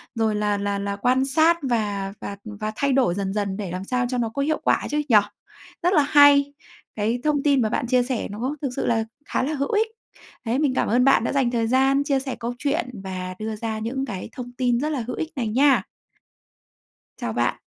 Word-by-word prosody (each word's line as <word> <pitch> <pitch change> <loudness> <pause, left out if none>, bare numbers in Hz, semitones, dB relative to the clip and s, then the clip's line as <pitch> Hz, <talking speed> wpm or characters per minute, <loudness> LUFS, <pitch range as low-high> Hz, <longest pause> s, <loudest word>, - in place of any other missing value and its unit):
rồi 220 -2 +1
là 210 -1 0
là 200 0 -2
là 200 0 -3
quan 255 +5 +2
sát 320 +5 +4
và 205 -6 -1
và, 200 - -5
ừm, 210 -2 -9
và 215 +1 -3
thay 280 +1 +1
đổi 255 -10 +3
dần 195 -1 -2
dần 200 -2 -2
để 195 -5 -5
làm 185 +1 -4
sao 250 +3 -1
cho 255 - -1
nó 235 -2 0
có 250 +5 -3
hiệu 310 +2 0
quả - - +1
chứ 295 - 0
nhỉ? 225 - +5 0.7
Rất 360 +2 +3
là 300 - +5
hay, 285 -1 +6 0.4
cái 225 +3 0
thông 295 -2 +1
tin 280 -3 +3
mà 215 - +1
bạn 240 - -1
chia 250 0 +3
sẻ 245 -2 -2
nó 250 +8 -3
thực 275 - -1
sự - - -2
là 225 -2 +1 0.2
khá - - 0
là 300 - -1
hữu 280 -1 -2
ích. 440 +1 +2 0.6
Đấy, 240 +5 0
mình 285 -4 +2
cảm - - 0
ơn 245 +3 +3
bạn 270 - +5
đã - - -1
dành 265 -4 +2
thời 230 -2 0
gian 270 +3 +3
chia 280 -2 +1
sẻ 265 -1 -4
câu 240 +1 -3
chuyện 290 0 -1
và 185 -1 -5
đưa 215 0 -3
ra 220 0 -4
những 255 +5 -3
cái 195 -7 -6
thông 245 -2 -8
tin 245 -2 +1
rất 300 +4 -1
là 280 -6 -2
hữu 250 - -3
ích 320 - -3
này 240 -4 -2
nha! 255 -2 +4 1.3
Chào - - -4
bạn. - - +1
245 Hz, 240 wpm, -23 LUFS, 215-275 Hz, 1.3 s, hay